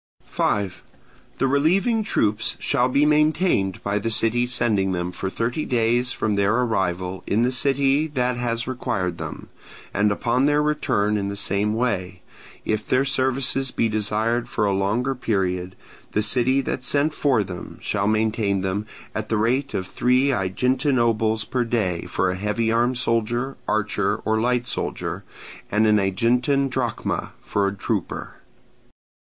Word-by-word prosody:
5. 100 -3 -1 0.6
The - - +1
relieving 180 - +2
troops 110 - 0
shall 125 +1 +1
be 140 +3 +3
maintained 150 - +2
by 100 +1 0
the 115 - -2
city 115 +2 +2
sending 105 -6 +1
them 90 0 -2
for 95 +1 -4
thirty 120 +9 -2
days 120 +1 +1
from 110 - -1
their 100 +1 +2
arrival 95 -6 -1
in 110 +3 +2
the 125 - +2
city 135 +3 +2
that 125 -4 -1
has 120 -1 -2
required 95 -8 -2
them, - - -7 0.4
and 105 +1 +2
upon 125 +6 +1
their 145 0 +3
return 105 -8 +1
in 100 -1 -2
the 100 - -4
same 100 +1 -1
way: 90 -7 -2 0.4
if 110 0 -1
their 130 +1 +2
services 130 0 +1
be 115 - 0
desired 110 +3 0
for 105 - 0
a 100 - +1
longer 105 +7 0
period, 95 -7 -2 0.4
the 105 - +1
city 130 +5 +2
that 130 - -3
sent 145 +4 +2
for 130 -9 +2
them 90 -2 -8
shall 100 -1 -1
maintain 110 -2 +1
them, 95 +3 -2 0.3
at 110 0 -4
the 110 - +1
rate 125 +6 0
of 95 - -2
three 125 +7 +2
Aeginetan 125 +7 +1
obols 110 -2 +1
per 125 +2 -1
day 105 -8 -1
for 95 0 0
a - - -3
heavy 105 +4 -1
armed 120 +2 +2
soldier, 120 +2 0
archer, 105 -1 0
or 110 0 +1
light 125 0 +1
soldier, - - -3 0.5
and 105 +2 +2
an 105 -1 +4
Aeginetan 125 +8 +1
drachma 125 -4 -2
for 100 -1 0
a 100 - -3
trooper. - - -3
115 Hz, 155 wpm, -23 LUFS, 100-125 Hz, 0.6 s, an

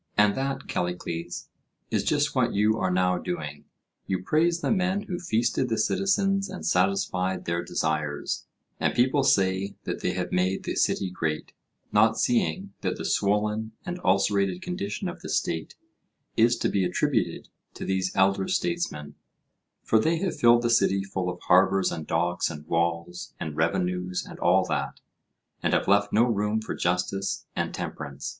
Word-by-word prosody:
And 105 0 +5
that, 135 +2 -3
Callicles, 90 -1 -3 0.4
is - - +1
just - - +1
what - - +1
you 105 +2 +3
are 95 - +1
now 90 0 +2
doing. 75 -5 -5 0.4
You 95 -1 -1
praise 170 - +2
the - - 0
men 190 0 +1
who 180 -4 -4
feasted 120 -2 0
the 115 - 0
citizens 195 - +1
and 190 - -7
satisfied 95 0 +1
their 85 0 -1
desires, 75 -3 -2 0.3
and - - +1
people 130 +4 +3
say 95 -5 +2
that - - -3
they - - 0
have - - -3
made 95 +1 +1
the - - -2
city 95 -2 +1
great, 80 -3 -3 0.4
not 110 +2 +4
seeing 100 -4 0
that - - -1
the - - -5
swollen 105 +2 0
and 180 -1 -4
ulcerated 95 -1 +2
condition 100 +4 -3
of - - -6
the - - -7
State 80 -1 -1 0.6
is 120 +2 +4
to - - 0
be 100 - +1
attributed 90 - 0 0.3
to - - -6
these 95 -1 0
elder 95 0 +3
statesmen; 170 - -2 0.7
for 110 - +3
they 160 +9 +2
have 185 +1 -2
filled 120 -2 +6
the 120 - +2
city 100 -4 +3
full 95 -2 -3
of 90 0 -5
harbours 95 +1 +4
and 80 - -5
docks 85 +1 0
and 75 -1 -8
walls 85 +1 -2
and 75 -2 -4
revenues 90 +3 -1
and - - -10
all 90 +2 +4
that, 75 -5 -2 0.6
and - - +1
have - - +2
left 100 +1 +3
no 110 - +4
room 105 -2 +1
for 110 - -5
justice 90 +3 -1
and - - -1
temperance. 70 -2 -5
95 Hz, 165 wpm, -26 LUFS, 90-115 Hz, 0.7 s, filled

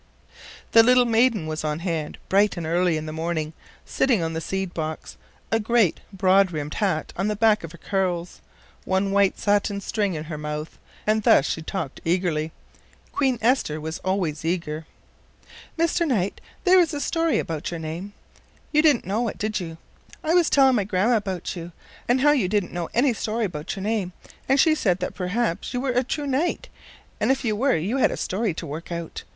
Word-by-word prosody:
The 230 - +8
little 250 +1 +5
maiden 230 -5 +3
was 155 0 -4
on 150 -1 -1
hand 165 -3 -3
bright 200 0 +3
and 170 - -3
early 170 0 +2
in 155 - -5
the 155 - -5
morning, 160 -1 -2 0.3
sitting 240 -10 +1
on 165 0 -2
the 160 - -3
seed 190 +1 -3
box, 155 -1 -5 0.4
a 225 - +3
great 225 -4 +2
broad 195 0 +4
brimmed 150 -3 -4
hat 190 -7 -1
on 195 +3 -1
the 210 - 0
back 215 -1 +3
of 165 - -7
her 170 - -12
curls, 180 -2 -2 0.4
one 190 +1 0
white 200 -1 +3
satin 205 0 +1
string 200 -2 -1
in 155 - -4
her 155 -1 -6
mouth, 150 +1 -5 0.3
and 215 +1 +2
thus 145 - +5
she 160 - -2
talked 160 -4 -5
eagerly. 165 -3 0 0.6
Queen 265 -3 +1
Esther 230 - +2
was 160 +1 -5
always 185 -6 -1
eager. 165 -2 -2 0.9
"Mr. 335 +1 +1
Knight, 205 -8 -1 0.2
there 370 0 +6
is 330 -3 +2
a - - -2
story 330 +2 +1
'bout 160 -2 -4
your 170 - -5
name. 165 +6 -6 0.6
You 305 - +4
didn't 295 - +3
know 215 +6 0
it, - - -5
did 215 0 -1
you? 165 -3 -6 0.5
I 320 +1 +1
was 350 -3 +4
telling 265 -3 +5
my 205 - +1
grandma 205 +4 +2
'bout 190 -4 -4
you, 170 0 -7 0.3
and 250 +2 +3
how 295 +1 +6
you 260 -11 +2
didn't 200 -1 -1
know 175 -1 -3
any 250 +2 +4
story 225 +1 -1
'bout 160 -2 -5
your 195 - -6
name, 205 -4 -1 0.4
and 270 +1 +4
she 315 +3 +5
said 190 - +1
that 180 - -4
perhaps 185 +4 -2
you - - 0
were 260 0 0
a 250 +1 +2
true 290 +4 -3
knight, 280 +6 -1 0.5
and - - +1
if 265 0 +1
you 215 -2 +1
were 260 +5 +2
you 200 +11 -1
had 265 - +4
a - - -4
story 195 -2 -1
to - - -5
work 155 +5 -7
out. 170 -1 -5
195 Hz, 200 wpm, -24 LUFS, 165-235 Hz, 0.9 s, The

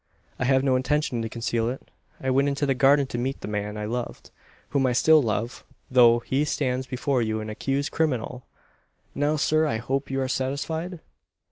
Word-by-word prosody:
I 125 - 0
have 130 0 +3
no 135 -2 +3
intention 130 -1 0
to 115 - -3
conceal 115 0 -1
it. 130 - -8 0.3
I 130 - -1
went 135 +2 +3
into 140 +1 0
the 135 - +2
garden 140 +2 +4
to 120 -2 -5
meet 135 +3 -3
the - - -6
man 105 0 -3
I 105 - -3
loved 120 +2 -5 0.4
whom 135 -2 +2
I 125 - +1
still 155 +5 +5
love, 115 0 -2 0.3
though 120 -2 +6
he 135 +4 0
stands 130 -3 -1
before 130 0 0
you 110 -1 -1
an 110 0 -5
accused 135 +6 -2
criminal! 125 -5 -2 0.7
Now, 145 +2 +1
sir, 155 +1 +2
I 110 - 0
hope 135 +5 -2
you 135 0 -1
are 130 - 0
satisfied?" 160 +7 -3
130 Hz, 195 wpm, -25 LUFS, 120-140 Hz, 0.7 s, though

